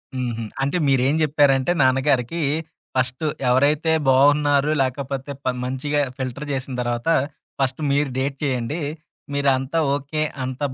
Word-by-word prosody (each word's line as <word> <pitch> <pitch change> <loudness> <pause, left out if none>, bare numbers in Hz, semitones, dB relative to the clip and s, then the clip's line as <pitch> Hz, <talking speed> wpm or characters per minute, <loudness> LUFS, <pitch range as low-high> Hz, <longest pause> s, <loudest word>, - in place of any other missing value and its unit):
హుహు. 120 -3 -2 0.2
అంటే 140 +6 0
మీరేం 135 +1 +3
జెప్పారంటే 145 0 +3
నాన్నగారికి 130 +2 +2 0.6
ఫస్టు 130 +4 -1 0.2
ఎవరైతే 145 +5 +3 0.2
బావున్నారో 145 +2 +4
లేకపోతే 135 +1 -3
ప - - +1 0.2
మంచిగా 140 +3 -1 0.2
ఫిల్టర్ 130 +3 -4
జేసిన 135 -1 -3
తర్వాత 120 +4 -2 0.5
ఫస్ట్ 135 +2 0
మీరు 140 0 +2
డేట్ 135 +1 -1
చేయండి. 130 +4 -1 0.5
మీరంతా 140 +2 +1 0.2
ఓకే. 145 +2 -3 0.2
అంతా 130 +3 -3
135 Hz, 115 wpm, -22 LUFS, 130-145 Hz, 0.6 s, బావున్నారో